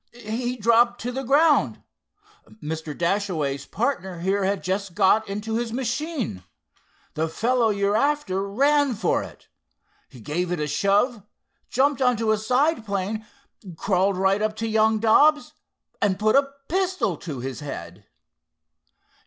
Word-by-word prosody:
"He 240 Hz, +2 st, -4 dB
dropped 235 Hz, +2 st, +3 dB
to 245 Hz, -, -3 dB
the 265 Hz, +2 st, -4 dB
ground. 275 Hz, -, +3 dB, 0.8 s
Mr. 155 Hz, 0 st, -5 dB
Dashaway's 170 Hz, -6 st, -1 dB
partner 190 Hz, -8 st, -2 dB
here 195 Hz, +2 st, 0 dB
had 195 Hz, 0 st, -1 dB
just 190 Hz, -1 st, -3 dB
got 205 Hz, +2 st, +3 dB
into 215 Hz, +3 st, -3 dB
his 235 Hz, -1 st, -3 dB
machine. 255 Hz, -, -3 dB, 0.7 s
The 160 Hz, +1 st, -1 dB
fellow 235 Hz, +6 st, +1 dB
you're 200 Hz, 0 st, +1 dB
after 220 Hz, -8 st, 0 dB
ran 280 Hz, +3 st, +2 dB
for 200 Hz, -4 st, 0 dB
it. -, -, -12 dB, 0.6 s
He 125 Hz, -, -14 dB
gave 170 Hz, +9 st, -3 dB
it 175 Hz, -, -1 dB
a 150 Hz, -, -1 dB
shove, 205 Hz, -, +1 dB, 0.5 s
jumped 275 Hz, +2 st, +1 dB
onto 235 Hz, -4 st, +2 dB
a 215 Hz, -, +1 dB
side 255 Hz, +5 st, +1 dB
plane, 205 Hz, +1 st, -3 dB, 0.5 s
crawled 190 Hz, 0 st, +1 dB
right 195 Hz, +2 st, +2 dB
up 215 Hz, 0 st, -1 dB
to 225 Hz, +1 st, -3 dB
young 220 Hz, 0 st, +3 dB
Dobbs, 295 Hz, +8 st, +4 dB, 0.5 s
and 190 Hz, -2 st, +2 dB
put 215 Hz, +1 st, +2 dB
a 275 Hz, 0 st, +4 dB, 0.2 s
pistol 370 Hz, -, 0 dB
to 145 Hz, -5 st, -7 dB
his 130 Hz, 0 st, -5 dB
head!" 100 Hz, -, -8 dB
215 Hz, 140 wpm, -24 LUFS, 185-245 Hz, 0.8 s, Dobbs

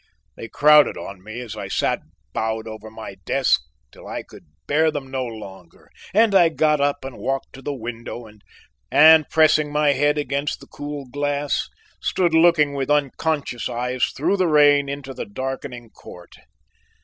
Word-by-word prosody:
They 115 Hz, -, -8 dB
crowded 150 Hz, +4 st, +5 dB
on 95 Hz, -2 st, -9 dB
me 110 Hz, +4 st, -7 dB
as 110 Hz, -3 st, -7 dB
I 105 Hz, -, -6 dB
sat -, -, 0 dB, 0.3 s
bowed 110 Hz, 0 st, -2 dB
over 110 Hz, 0 st, -9 dB
my 110 Hz, -3 st, -9 dB
desk -, -, +2 dB, 0.3 s
till -, -, -14 dB
I -, -, -5 dB
could -, -, -16 dB, 0.2 s
bear 160 Hz, +2 st, +2 dB
them 140 Hz, -3 st, -6 dB
no 130 Hz, -1 st, -2 dB
longer 100 Hz, -7 st, -11 dB, 0.2 s
and 215 Hz, +2 st, +3 dB
I 175 Hz, -4 st, +6 dB
got 155 Hz, -2 st, +1 dB
up 145 Hz, -1 st, 0 dB
and 135 Hz, -2 st, -8 dB
walked 135 Hz, 0 st, -3 dB
to 135 Hz, -, -11 dB
the 145 Hz, +1 st, -4 dB
window 120 Hz, -1 st, -7 dB, 0.6 s
and, 160 Hz, 0 st, +7 dB
pressing 155 Hz, -2 st, +3 dB
my 150 Hz, -1 st, +3 dB
head 145 Hz, +2 st, +1 dB
against 145 Hz, 0 st, -2 dB
the -, -, -13 dB
cool 145 Hz, -1 st, -7 dB
glass, 145 Hz, +2 st, -2 dB, 0.3 s
stood 175 Hz, -3 st, 0 dB
looking 160 Hz, -3 st, +4 dB
with 135 Hz, -1 st, -3 dB
unconscious 145 Hz, -2 st, -1 dB
eyes 125 Hz, +1 st, -1 dB
through 175 Hz, +8 st, -1 dB
the 185 Hz, -2 st, +2 dB
rain 145 Hz, -2 st, +4 dB
into 140 Hz, -1 st, -6 dB
the 120 Hz, -, -6 dB
darkening 125 Hz, 0 st, -6 dB
court. 90 Hz, 0 st, -14 dB
140 Hz, 165 wpm, -22 LUFS, 120-150 Hz, 0.6 s, and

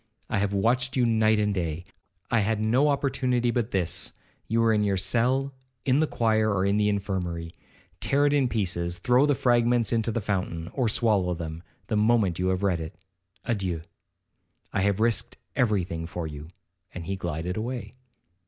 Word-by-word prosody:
I -, -, +1 dB
have 100 Hz, 0 st, 0 dB
watched 125 Hz, +6 st, +1 dB
you 125 Hz, -, +4 dB
night 110 Hz, -1 st, +3 dB
and 105 Hz, -1 st, +1 dB
day. 85 Hz, -3 st, -2 dB, 0.5 s
I 115 Hz, -, +4 dB
had 110 Hz, +1 st, 0 dB
no 120 Hz, +7 st, +3 dB
opportunity 130 Hz, -4 st, +1 dB
but 120 Hz, -2 st, -1 dB
this,—you 100 Hz, +4 st, -3 dB
were 115 Hz, -1 st, +4 dB
in 105 Hz, -1 st, +2 dB
your 100 Hz, -2 st, +1 dB
cell, 125 Hz, +8 st, +1 dB, 0.3 s
in 135 Hz, +1 st, +3 dB
the 155 Hz, -, +2 dB
choir, 110 Hz, -3 st, +1 dB
or 95 Hz, -1 st, +1 dB
in 100 Hz, +1 st, +2 dB
the 105 Hz, 0 st, +3 dB
infirmary. 90 Hz, -5 st, -3 dB, 0.5 s
Tear 140 Hz, +1 st, +2 dB
it 145 Hz, -, +3 dB
in 140 Hz, -3 st, +3 dB
pieces, 85 Hz, -5 st, -1 dB
throw 125 Hz, +10 st, +3 dB
the 145 Hz, -, +3 dB
fragments 120 Hz, -2 st, +2 dB
into 115 Hz, 0 st, +1 dB
the 115 Hz, -, -1 dB
fountain, 90 Hz, -5 st, -3 dB
or 125 Hz, -5 st, +1 dB
swallow 105 Hz, -6 st, +1 dB
them, 80 Hz, -1 st, -6 dB, 0.2 s
the 110 Hz, -, -1 dB
moment 105 Hz, -5 st, +2 dB
you 90 Hz, -, +1 dB
have 95 Hz, +1 st, 0 dB
read 90 Hz, -4 st, +1 dB
it.—Adieu. 90 Hz, +1 st, -5 dB, 0.9 s
I 95 Hz, -, +1 dB
have 100 Hz, 0 st, +1 dB
risked 115 Hz, 0 st, +1 dB, 0.2 s
every 105 Hz, -6 st, +2 dB
thing 85 Hz, -2 st, -5 dB
for 85 Hz, 0 st, -5 dB
you,' 75 Hz, -1 st, -7 dB, 0.5 s
and 85 Hz, -2 st, -6 dB
he 95 Hz, -, -2 dB
glided 85 Hz, -1 st, -3 dB
away. 120 Hz, +3 st, -4 dB
105 Hz, 175 wpm, -26 LUFS, 90-120 Hz, 0.9 s, you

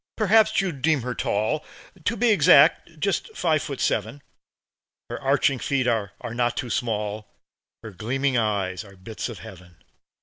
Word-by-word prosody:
Perhaps 220 Hz, 0 st, +3 dB
you'd 175 Hz, -9 st, -2 dB
deem 155 Hz, -3 st, +2 dB
her 125 Hz, 0 st, -3 dB
tall 110 Hz, +7 st, -1 dB, 0.4 s
To 230 Hz, -, 0 dB
be 240 Hz, -2 st, +3 dB
exact, 155 Hz, -2 st, +5 dB
just 200 Hz, -, -2 dB
five 155 Hz, -3 st, +1 dB
feet 140 Hz, -, -6 dB
seven. 110 Hz, +7 st, -1 dB, 0.9 s
Her -, -, -5 dB
arching 140 Hz, 0 st, +2 dB
feet 135 Hz, -1 st, 0 dB
are 110 Hz, -5 st, -1 dB
not 120 Hz, +1 st, -1 dB
too 120 Hz, -, -3 dB
small; 105 Hz, -2 st, -2 dB, 0.6 s
Her 110 Hz, -, -8 dB
gleaming 130 Hz, +7 st, -1 dB
eyes 100 Hz, -6 st, -1 dB
are 100 Hz, -2 st, -15 dB
bits 105 Hz, +6 st, -6 dB
of 115 Hz, -, -8 dB
heaven. 90 Hz, -1 st, -13 dB
125 Hz, 155 wpm, -24 LUFS, 105-150 Hz, 0.9 s, exact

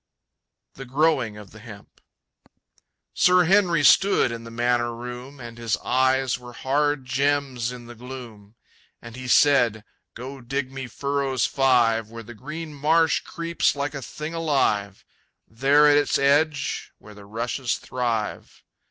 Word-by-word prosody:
The 135 Hz, -, -9 dB
Growing 135 Hz, -5 st, +1 dB
of 105 Hz, -2 st, -12 dB
the 110 Hz, -, -14 dB
Hemp. 105 Hz, -2 st, -14 dB, 1.1 s
Sir 180 Hz, 0 st, +4 dB
Henry 175 Hz, -3 st, +3 dB
stood 195 Hz, -4 st, +4 dB
in 115 Hz, 0 st, -7 dB
the -, -, -9 dB
manor 120 Hz, 0 st, 0 dB
room, 125 Hz, +3 st, -8 dB
And 120 Hz, -1 st, -10 dB
his 115 Hz, -4 st, -1 dB
eyes 130 Hz, -1 st, +1 dB
were 120 Hz, 0 st, -12 dB
hard 145 Hz, +1 st, 0 dB
gems 135 Hz, -2 st, -1 dB
in 125 Hz, -1 st, -10 dB
the 120 Hz, -, -10 dB
gloom. 120 Hz, -4 st, -11 dB, 0.4 s
And 120 Hz, -1 st, -11 dB
he 130 Hz, 0 st, -8 dB
said, 120 Hz, -6 st, +4 dB, 0.3 s
"Go 130 Hz, +2 st, -8 dB
dig 130 Hz, +2 st, -3 dB
me 135 Hz, -1 st, -6 dB
furrows 140 Hz, -2 st, -1 dB
five 120 Hz, -5 st, +2 dB
Where 115 Hz, 0 st, -9 dB
the 120 Hz, +2 st, -11 dB
green 150 Hz, +7 st, -8 dB
marsh 160 Hz, +3 st, +2 dB
creeps 170 Hz, -2 st, -1 dB
like 145 Hz, +1 st, -3 dB
a 140 Hz, -, -6 dB
thing 155 Hz, +5 st, -7 dB
alive 135 Hz, -, 0 dB, 0.4 s
There 140 Hz, +6 st, +4 dB
at 145 Hz, 0 st, +5 dB
its 145 Hz, -, +2 dB
edge, 145 Hz, +1 st, +1 dB
where 105 Hz, -, -15 dB
the 100 Hz, -1 st, -14 dB
rushes 120 Hz, +4 st, -2 dB
thrive." 115 Hz, -4 st, -4 dB
130 Hz, 145 wpm, -24 LUFS, 115-145 Hz, 1.1 s, at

